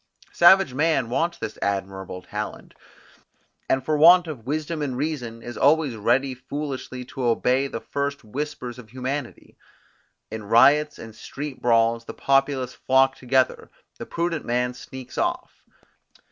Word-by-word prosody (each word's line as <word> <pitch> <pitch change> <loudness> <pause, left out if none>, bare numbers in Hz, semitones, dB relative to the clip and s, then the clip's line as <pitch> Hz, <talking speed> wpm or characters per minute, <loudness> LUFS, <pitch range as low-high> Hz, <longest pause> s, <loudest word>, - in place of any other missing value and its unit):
Savage 175 -5 +6
man 145 -4 +1
wants 170 +6 0
this 110 - -6
admirable 95 -2 -3
talent; 105 +1 -6 1.0
and 130 0 +1
for 155 - +1
want 175 +4 +7
of 135 -8 -8
wisdom 155 +2 -2
and 130 -4 -2
reason, 125 -6 -4
is 120 -2 -7
always 145 -3 +3
ready 130 +5 +1
foolishly 130 -1 -6
to 130 +1 -8
obey 125 +3 +2
the 115 - -5
first 140 -1 -3
whispers 125 +1 -5
of 115 -3 -13
humanity. 130 +2 -6 0.7
In 110 -1 -6
riots 145 +8 +4
and 110 -1 -10
street 145 +2 -7
brawls 115 -1 +2
the - - -8
populace 135 -2 +1
flock 135 0 +2
together, 130 0 0 0.3
the - - -7
prudent 170 -2 -2
man 125 +1 -1
sneaks 125 0 -9
off. 345 0 -3
130 Hz, 140 wpm, -24 LUFS, 120-150 Hz, 1.0 s, want